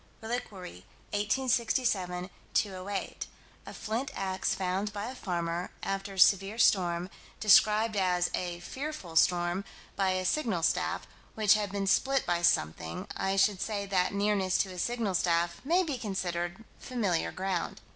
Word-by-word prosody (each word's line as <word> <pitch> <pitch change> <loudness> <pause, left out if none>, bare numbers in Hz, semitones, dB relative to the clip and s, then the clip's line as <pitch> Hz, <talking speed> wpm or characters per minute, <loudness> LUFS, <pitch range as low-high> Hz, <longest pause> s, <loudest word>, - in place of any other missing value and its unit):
Reliquary, 205 - -6 0.3
1867 210 -5 0 0.2
208: 195 0 -2 0.4
A - - -7
flint 230 +5 -3
ax 190 -1 -1
found 190 +2 -1
by 205 0 -4
a 250 - -5
farmer, 175 -5 -3
after 195 0 -3
a - - -5
severe 195 +3 +5
storm 180 -6 +3 0.3
described 215 +1 +5
as 180 -2 +1
a 175 -1 -3
"fearful 265 - -6
storm" 175 +2 +3 0.3
by 190 -1 +1
a 185 0 -2
signal 190 - 0
staff, 170 - 0 0.3
which 215 -2 +5
had 210 -2 -1
been 200 0 -2
split 270 +7 +2
by 175 -1 0
something. 80 - 0
I 195 0 0
should 195 0 +3
say 205 -2 -2
that 185 -2 +1
nearness 200 -2 +1
to 190 - -9
a 180 - -7
signal 230 -2 -1
staff 170 -1 +1
may 345 +7 +3
be 290 -7 -3
considered 185 -1 -3
familiar 205 -9 -1
ground. 185 -2 -3
195 Hz, 145 wpm, -30 LUFS, 180-215 Hz, 0.4 s, severe